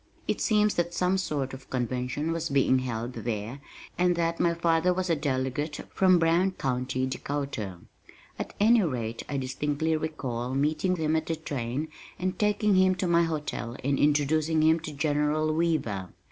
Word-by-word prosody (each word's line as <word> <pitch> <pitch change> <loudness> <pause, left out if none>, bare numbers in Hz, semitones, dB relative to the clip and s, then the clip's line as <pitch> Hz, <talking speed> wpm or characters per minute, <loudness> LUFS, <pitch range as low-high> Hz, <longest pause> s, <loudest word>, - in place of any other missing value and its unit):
It - - -1
seems 210 -2 +3
that 175 0 -1
some 180 +1 +2
sort 145 -7 -2
of 130 0 -10
convention 125 +5 -2
was 165 0 -2
being 135 -2 +3
held 120 -1 -3
there 115 +2 -4 0.4
and 180 0 +3
that 170 0 0
my 170 -1 +2
father 170 +1 +2
was 185 -1 -1
a - - +4
delegate 145 +1 -1 0.2
from 185 -1 +5
Brown 170 +3 +3
County, 130 -4 -1
Dakota. 130 -7 -4 0.6
At - - -5
any 225 +2 +5
rate 120 - -2
I 140 - -1
distinctly 145 +4 -1
recall 130 -6 -3
meeting 155 +6 +1
him 160 -2 0
at 160 0 -1
the 165 - 0
train 140 -2 -3 0.3
and 185 0 -2
taking 210 0 +2
him 185 0 +4
to 185 - -2
my 170 -1 +4
hotel 150 -6 -4
and 140 +1 +1
introducing 150 +2 +2
him 160 +1 +4
to 155 -1 -7
General 150 +1 +1
Weaver. 145 - 0
150 Hz, 165 wpm, -28 LUFS, 130-170 Hz, 0.6 s, from